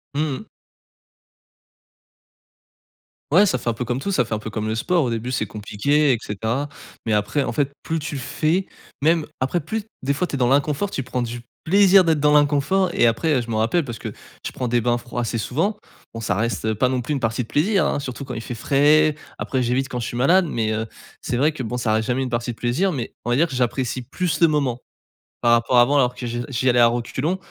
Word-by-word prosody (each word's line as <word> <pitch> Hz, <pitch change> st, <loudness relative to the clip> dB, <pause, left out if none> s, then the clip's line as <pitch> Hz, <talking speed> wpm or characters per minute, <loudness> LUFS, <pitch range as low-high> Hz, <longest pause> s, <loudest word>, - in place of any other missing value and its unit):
Mmh 145 Hz, -, +1 dB, 0.2 s
mh. -, -, -11 dB, 2.9 s
Ouais, 195 Hz, +6 st, +6 dB
ça 130 Hz, -, +1 dB
fait 120 Hz, -, -3 dB
un -, -, +1 dB
peu 125 Hz, -, -4 dB
comme 125 Hz, +3 st, -2 dB
tout, 200 Hz, -, -3 dB
ça 125 Hz, -9 st, +2 dB
fait 110 Hz, -1 st, -2 dB
un -, -, -3 dB
peu 110 Hz, -, -6 dB
comme 110 Hz, +1 st, -3 dB
le 110 Hz, -, -1 dB
sport, 170 Hz, +9 st, +1 dB
au 120 Hz, -, -1 dB
début 115 Hz, +2 st, -3 dB
c'est 110 Hz, -5 st, -1 dB
compliqué 135 Hz, +9 st, +1 dB
et -, -, +1 dB
cetera. 115 Hz, +8 st, -2 dB, 0.4 s
Mais 110 Hz, -, +1 dB
après 105 Hz, +7 st, +1 dB
en 120 Hz, -, -2 dB
fait, 140 Hz, +3 st, 0 dB
plus 165 Hz, -, -2 dB
tu 150 Hz, -1 st, -4 dB
le 135 Hz, -, -4 dB
fais, 165 Hz, +8 st, 0 dB, 0.3 s
même 160 Hz, +1 st, +3 dB
après 130 Hz, +7 st, 0 dB
plus 205 Hz, +8 st, -4 dB, 0.2 s
des 140 Hz, +2 st, +1 dB
fois 180 Hz, +6 st, -1 dB
tu 145 Hz, -, -4 dB
es -, -, -2 dB
dans 125 Hz, -1 st, +2 dB
l'inconfort, 145 Hz, +7 st, +1 dB
tu -, -, -2 dB
prends 125 Hz, -1 st, -3 dB
du 120 Hz, 0 st, -5 dB, 0.2 s
plaisir 195 Hz, +2 st, +6 dB
d'être 160 Hz, -3 st, +2 dB
dans 150 Hz, +1 st, +3 dB
l'inconfort 150 Hz, +6 st, +3 dB
et 120 Hz, -, +4 dB
après 135 Hz, +4 st, +1 dB
je 115 Hz, -, -8 dB
m'en 110 Hz, -, -1 dB
rappelle 140 Hz, +9 st, +1 dB
parce 120 Hz, -4 st, -6 dB
que -, -, -6 dB, 0.3 s
je -, -, -3 dB
prends 125 Hz, -, -3 dB
des 120 Hz, 0 st, +1 dB
bains 120 Hz, +1 st, +1 dB
froids 120 Hz, 0 st, -5 dB
assez 115 Hz, 0 st, -2 dB
souvent. 165 Hz, -, -1 dB, 0.4 s
Bon, 115 Hz, -, -6 dB
ça 100 Hz, -4 st, 0 dB
reste, 110 Hz, -1 st, -1 dB
heu, 110 Hz, 0 st, 0 dB
pas 125 Hz, +4 st, +2 dB
non 130 Hz, -1 st, 0 dB
plus 125 Hz, +5 st, -3 dB
une 140 Hz, -, -1 dB
partie 115 Hz, 0 st, -1 dB
de 115 Hz, -, -6 dB
plaisir, 190 Hz, +7 st, +2 dB
hein. -, -, -1 dB
Surtout 135 Hz, 0 st, -6 dB
quand 130 Hz, -2 st, -6 dB
il 110 Hz, -, -4 dB
fait 120 Hz, -, -6 dB
frais, 150 Hz, +5 st, +3 dB, 0.2 s
après 130 Hz, -2 st, -1 dB
j'évite 130 Hz, +3 st, 0 dB
quand 125 Hz, -3 st, -3 dB
je 115 Hz, -, -3 dB
suis 120 Hz, -, -5 dB
malade, 175 Hz, +9 st, +4 dB
mais 110 Hz, -5 st, -1 dB
heu, 110 Hz, +1 st, -1 dB, 0.4 s
c'est 120 Hz, -, -2 dB
vrai 150 Hz, +4 st, +3 dB
que 135 Hz, -, -5 dB
bon, 125 Hz, +2 st, -3 dB
ça 120 Hz, -3 st, 0 dB
reste 110 Hz, 0 st, 0 dB
jamais 125 Hz, +2 st, 0 dB
une 130 Hz, -, -2 dB
partie 120 Hz, 0 st, -2 dB
de -, -, -10 dB
plaisir, 135 Hz, +11 st, +1 dB
mais 130 Hz, -8 st, -5 dB
on 120 Hz, -, -1 dB
va -, -, +3 dB
dire 165 Hz, +5 st, +3 dB
que 135 Hz, -, -7 dB
j'apprécie 125 Hz, 0 st, -1 dB
plus 160 Hz, +6 st, -2 dB
le 170 Hz, -, +7 dB
moment 140 Hz, -6 st, 0 dB, 0.6 s
par 120 Hz, -, +3 dB
rapport 120 Hz, +1 st, +3 dB
à 120 Hz, -, +9 dB
avant 140 Hz, +4 st, +3 dB
alors 125 Hz, -2 st, +2 dB
que 125 Hz, -, -6 dB
je 120 Hz, 0 st, -3 dB
j'y 130 Hz, 0 st, +1 dB
allais 120 Hz, -, +3 dB
à 120 Hz, -, +7 dB
reculons. 130 Hz, +9 st, -1 dB
130 Hz, 255 wpm, -22 LUFS, 120-150 Hz, 2.9 s, à